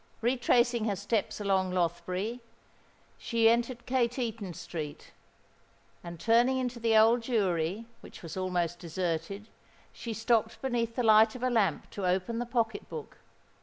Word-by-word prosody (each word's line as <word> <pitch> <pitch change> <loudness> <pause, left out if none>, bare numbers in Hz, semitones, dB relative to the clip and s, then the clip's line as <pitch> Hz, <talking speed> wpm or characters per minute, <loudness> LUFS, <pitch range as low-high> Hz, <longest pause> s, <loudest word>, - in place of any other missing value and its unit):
Retracing 240 -1 +2
her 205 -3 0
steps 205 +3 -2
along 190 -2 +1
Lothbury, 180 +6 -2 0.8
she 230 -1 +2
entered 235 +1 +1
Cateaton 235 -6 -1
Street; 155 -3 -7 0.9
and 170 -1 -8
turning 240 +5 +3
into 250 -2 -3
the 225 -1 +3
Old 225 +2 +5
Jewry, 200 -4 0 0.2
which - - -13
was 165 -2 -7
almost 175 -2 -1
deserted, 175 +3 -3 0.5
she 230 -2 -6
stopped 225 0 +1
beneath 235 -3 -2
the 245 - 0
light 220 0 +6
of 250 - -7
a 255 - +1
lamp 220 -5 +1
to 195 -3 -3
open 190 +6 0
the 240 - -3
pocket 225 -4 -1
book. 460 - -8
225 Hz, 140 wpm, -29 LUFS, 185-235 Hz, 0.9 s, light